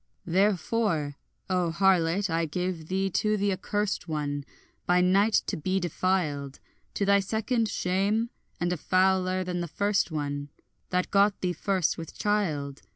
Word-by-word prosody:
Therefore 185 -4 +1 0.3
O 180 -2 +1
harlot, 185 +1 +2
I 165 -1 0
gave 175 0 -3
thee 190 +1 0
to 215 +4 +1
the 200 0 +1
accurst 205 +1 -2
one, 145 -2 -3 0.4
By 180 0 +4
night 195 +4 +3
to - - -2
be 185 +5 -1
defiled, 160 -6 -1 0.4
To 200 - 0
thy 200 0 +5
second 220 +3 0
shame, 200 +7 0 0.3
and 175 +1 0
a - - -3
fouler 185 +1 +2
than 180 -1 -3
the 175 - -2
first 200 +4 +1
one, 145 -2 -3 0.4
That 180 0 0
got 200 0 +3
thee 180 -1 0
first 180 0 0
with 165 -1 -8
child. 155 -10 -1
185 Hz, 150 wpm, -27 LUFS, 165-200 Hz, 0.4 s, thy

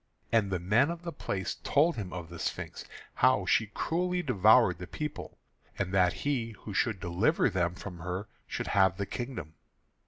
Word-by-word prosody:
And 110 -4 +3
the 95 - 0
men 105 - +3
of 170 0 -5
the 170 - -4
place 95 - -3
told 160 +4 +3
him 100 -5 -5
of 85 -2 -6
the 85 -1 -9
Sphinx, - - -4 0.3
how - - +3
she 110 - +3
cruelly 180 - -1
devoured 110 - +5
the 90 - -7
people, 150 - -6 0.4
and 95 -1 -2
that 90 -2 +4
he 120 -6 0
who 105 - -7
should 110 0 +1
deliver 90 - +2
them 90 -2 0
from 95 -2 -8
her 90 +4 -4 0.2
should - - -4
have 95 -2 +3
the 100 - -2
kingdom. 120 - -5
100 Hz, 180 wpm, -30 LUFS, 90-130 Hz, 0.4 s, devoured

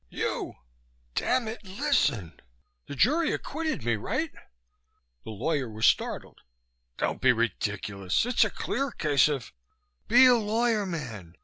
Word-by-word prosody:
"You, - - -3 0.6
damn 250 - 0
it. 220 0 -6
Listen! 185 - 0 0.5
The 145 - -6
jury 305 - +3
acquitted 315 - -3
me, 120 -2 +1
right?" 260 - -2 0.9
The - - -9
lawyer 130 +4 -2
was 110 0 -1
startled. - - 0 0.6
"Don't - - -2
be - - +6
ridiculous. 100 - -1
It's 245 -1 +3
a 215 - +1
clear 275 +7 -2
case 150 - +2
of 140 -5 -4 0.3
" 60 0 -46
"Be 245 +3 +7
a 250 - +7
lawyer, 220 -1 +1
man! 115 - -6
190 Hz, 135 wpm, -27 LUFS, -, 0.9 s, Be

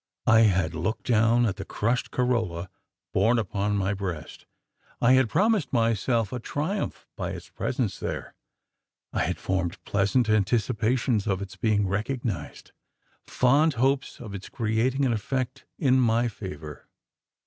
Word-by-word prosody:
I 110 0 +6
had 95 -7 +3
looked 85 +8 -3
down 115 0 +4
at 105 -4 -1
the - - -5
crushed 120 +4 -1
corolla 110 -9 -1 0.4
borne 110 +5 +3
upon 105 -1 -1
my 100 +1 0
breast. 90 -6 -6 0.5
I 125 +2 +5
had 130 -3 +4
promised 195 - +2
myself 115 -1 +1
a 125 - -2
triumph 155 - -3
by - - -3
its - - -9
presence - - -2
there. - - -4 0.8
I - - +1
had - - -2
formed 90 -2 -2
pleasant 105 +4 +1
anticipations 110 +2 +1
of 95 -2 +1
its 100 -1 -7
being 105 -3 +1
recognised 105 - -3 0.6
fond 145 +5 +3
hopes 135 +2 0
of 105 -5 -8
its 100 -1 -7
creating 120 +4 0
an 125 - +2
effect 125 +3 -3
in 130 -4 +3
my 120 0 +3
favour. 85 - -8
115 Hz, 140 wpm, -26 LUFS, 100-125 Hz, 0.8 s, I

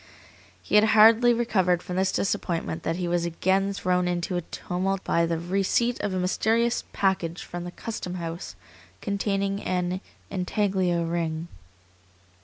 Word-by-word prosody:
He - - -9
had 210 0 +7
hardly 225 +3 +7
recovered 190 -7 +1
from 180 - -5
this 190 0 +2
disappointment 170 -4 -1
than 165 - -1
he 180 0 -2
was 175 0 +1
again 190 +3 +1
thrown 180 -2 0
into 175 +1 -1
a 175 - 0
tumult 185 +3 -3
by 170 0 +2
the 165 0 -1
receipt 195 +7 0
of 205 - -2
a 185 - -2
mysterious 225 +6 +1
package 180 -3 0
from 175 0 -6
the 175 - -6
custom 185 -3 -5
house 170 0 -6 0.4
containing 200 -1 -1
an 180 0 -1 0.3
intaglio 185 -2 0
ring. 165 0 -2
185 Hz, 145 wpm, -26 LUFS, 175-200 Hz, 0.4 s, had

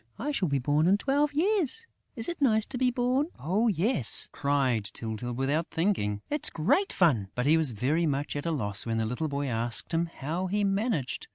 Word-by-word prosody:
"I 295 - -3
shall 200 -10 0
be 140 -2 0
born 145 +5 +1
in 195 +2 +4
twelve 285 +5 0
years.... 385 - +2 0.3
Is 225 -3 -2
it 345 -3 -5
nice 220 -5 +3
to 260 - -6
be 255 -1 +3
born?" 250 +4 0
"Oh, 200 +10 0
yes," 190 - +3
cried 135 -6 0
Tyltyl, 110 +3 -5
without 140 +6 -1
thinking. 105 - -1
"It's 295 - 0
great 210 - +1
fun!" 130 - +2
But 125 - -1
he 155 +3 +5
was 155 -6 +2
very 150 +10 0
much 145 0 -2
at 145 +3 -4
a - - 0
loss 105 -10 -1
when 115 -1 -2
the 110 - 0
little 125 +8 -3
boy 140 -1 -3
asked 115 -2 0
him 165 +1 +1
"how 165 +4 -4
he 205 +2 0
managed." 195 - -1
160 Hz, 205 wpm, -28 LUFS, -, 0.3 s, he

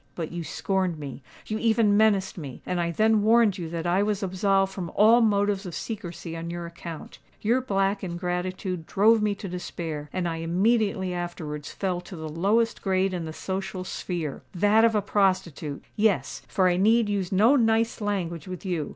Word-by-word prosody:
But 165 -3 -4
you 175 0 -4
scorned 185 +2 -1
me—you 145 - -7
even 220 -2 +3
menaced 205 -3 +3
me; 140 -7 -8
and 180 -1 -1
I 170 - 0
then 215 +4 +3
warned 220 -2 +4
you 165 -2 -4
that 165 0 -4
I 175 +3 +2
was 210 0 0
absolved 195 +1 +1
from 175 -3 -5
all 225 +3 +6
motives 205 -2 +2
of 175 - -6
secrecy 175 -6 -6
on 165 0 -5
your 170 0 -5
account. 170 -1 -9 0.2
Your 235 +5 +2
black 195 -4 0
ingratitude 180 0 -3
drove 220 +3 +4
me 210 -1 +1
to 200 - -7
despair; 165 -4 -5
and 185 -2 -1
I 165 -1 -2
immediately 190 +2 +1
afterwards 160 -4 -5
fell 185 -3 -2
to 180 +1 -10
the 160 -1 -6
lowest 200 +9 +1
grade 190 -1 +1
in 175 -2 -3
the 160 - -5
social 190 +2 -4
sphere—that 185 +5 0
of 230 -1 +4
a 210 - +1
prostitute! 185 -8 0
Yes—for 200 -2 +1
I 175 -1 +2
need 220 +3 +4
use 200 -2 -1
no 215 +8 +5
nice 225 -2 +2
language 180 -6 -2
with 185 +1 -7
you. 170 -6 -2
190 Hz, 175 wpm, -26 LUFS, 170-210 Hz, 0.2 s, all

